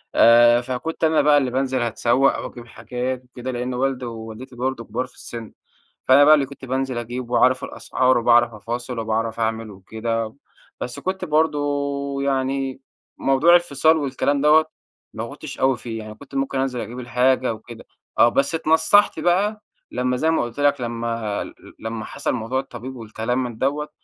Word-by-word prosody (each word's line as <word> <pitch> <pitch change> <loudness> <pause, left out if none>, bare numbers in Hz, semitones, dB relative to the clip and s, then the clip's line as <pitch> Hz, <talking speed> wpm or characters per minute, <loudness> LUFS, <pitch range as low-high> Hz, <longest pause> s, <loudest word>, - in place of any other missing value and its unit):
آآ 120 +1 +7
فكنت 130 +7 -5
أنا 160 -1 +4
بقى 150 -1 +5
اللي 130 -3 +1
بانزل 130 0 0
هاتسوّق، 120 +3 +2
أو - - -4
أجيب 120 -1 -11
حاجات 125 +3 -4
وكده. 125 +1 -7
لإن 125 +1 -3
والدي، 130 0 -1
ووالدتي 115 +2 -8
برضه 125 -1 -2
كُبار 115 +3 -3
في 125 - -23
السِن. 115 -2 -9 0.5
فأنا 140 +2 +7
بقى 155 +1 +8
اللي 145 -2 +1
كنت 135 0 -11
بانزل 130 -1 -2
أجيب 120 +1 -5
واعرف 125 +1 +3
الأسعار، 130 0 +1
وباعرف 120 0 +4
أفاصل، 120 +3 -5
وباعرف 115 +1 -2
أعمل 110 -1 -2
وكده. 110 +3 -4 0.5
بس 120 - -5
كنت 185 0 -3
برضه 155 -1 +2 0.6
يعني 135 -1 -1 0.4
موضوع 135 +6 +4
الفِصال 160 -2 +3
والكلام 140 0 0
دوّة، 155 +2 +5 0.5
ما 110 +1 -5
كنتش 140 0 -9
أوي 130 -1 +3
فيه. 115 -2 -6
يعني 110 0 -9
كنت 140 +4 -14
ممكن 135 0 -1
أنزل 130 -2 -1
أجيب 120 +2 -7
الحاجة 125 0 +1
وكده 110 +1 -12 0.3
آه. 120 - +7
بس 140 +6 +1
اتنصَّحت 165 +6 +3
بقى 205 +5 +1 0.3
لمّا 125 0 0
زي 160 +5 +1
ما 160 - +1
قُلت 120 +3 -7
لك 145 -2 +2
لمّا 115 -3 -3
ل - - -11 0.3
لمّا 110 -1 -5
حصل - - -3
موضوع 125 +2 -2
الطبيب 130 -1 -7
والكلام 115 +2 -2
من 120 -3 -6
دوّة. 145 +4 -1
125 Hz, 170 wpm, -22 LUFS, 115-135 Hz, 0.6 s, بقى